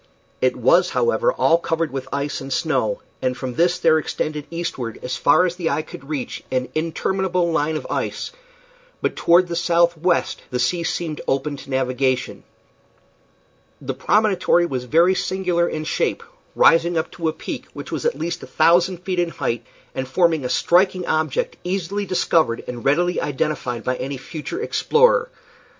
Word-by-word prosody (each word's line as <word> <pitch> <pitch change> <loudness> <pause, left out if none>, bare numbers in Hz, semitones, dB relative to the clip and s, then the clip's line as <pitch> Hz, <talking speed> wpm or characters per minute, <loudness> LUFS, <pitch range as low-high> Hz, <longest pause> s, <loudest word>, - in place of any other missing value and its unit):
It - - +2
was, - - +4
however, 485 +1 +2
all 165 - +3
covered 165 -1 -1
with 135 -1 -5
ice 140 +1 -2
and 135 0 -7
snow, - - 0 0.2
and 130 0 -1
from 130 -2 -4
this 175 +5 +2
there 160 -3 +4
extended 150 -1 -3
eastward 150 -9 -4
as 125 0 -3
far 180 +8 +4
as 180 0 -2
the 170 -3 -1
eye 155 - 0
could 140 -1 -12
reach 145 -5 -4
an 130 0 -1
interminable 175 +2 0
line 160 -1 0
of - - -7
ice, - - -3 0.7
but - - -1
toward 175 +2 +4
the 170 - -4
southwest 170 0 +1
the 125 - -2
sea 170 +8 0
seemed 160 -2 -3
open 135 +2 0
to 135 +1 -12
navigation. 130 -1 -1 1.4
The 135 -1 -4
promontory 185 +3 +2
was 130 -6 -3
very 170 +8 +4
singular 180 -2 0
in 155 - -4
shape, - - -1 0.3
rising 165 +1 +4
up 160 - -1
to 165 -2 -3
a - - +2
peak - - -7
which - - -8
was - - -3
at 475 0 0
least 170 - -3
a - - -9
thousand 175 +1 +3
feet 185 -2 -2
in 175 -1 +1
height, 120 -7 -3 0.3
and 130 - -3
forming 160 +1 +2
a 125 - -2
striking 185 +3 +2
object, 470 - -1
easily 195 +2 -2
discovered 165 -9 +1
and 120 -1 -6
readily 175 +6 +2
identified 130 -4 -2
by 125 0 -1
any 135 +1 -4
future 160 - -6
explorer. 480 +2 +3
165 Hz, 170 wpm, -21 LUFS, 135-180 Hz, 1.4 s, was